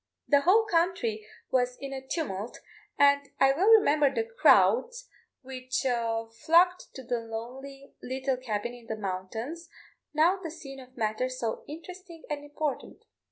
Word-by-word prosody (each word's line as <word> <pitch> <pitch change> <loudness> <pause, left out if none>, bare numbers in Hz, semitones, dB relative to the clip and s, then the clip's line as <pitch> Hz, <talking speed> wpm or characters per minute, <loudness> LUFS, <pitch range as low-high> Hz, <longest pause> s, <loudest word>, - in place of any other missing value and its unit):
The 285 -1 +4
whole 410 +8 +4
country 330 - 0 0.2
was 250 -1 +1
in 275 -1 -6
a 265 - -5
tumult, 245 - -4 0.4
and 280 0 +4
I 270 - +6
well 345 +9 +1
remember 300 -11 +5
the 455 - -1
crowds 480 +1 +3 0.4
which 255 -1 -4 0.5
flocked 340 +8 +3
to 265 - -8
the 240 -1 -2
lonely 255 +5 -8
little 265 +1 -2
cabin 240 -2 -3
in 240 -2 -14
the 220 - -4
mountains, 220 - -5 0.4
now 325 +5 +3
the 335 - -5
scene 280 -4 -10
of 255 0 -15
matters 235 +3 -1
so 225 -3 -3
interesting 340 +2 -10
and 290 -1 -3
important. 290 -1 -5
275 Hz, 145 wpm, -28 LUFS, 245-330 Hz, 0.5 s, I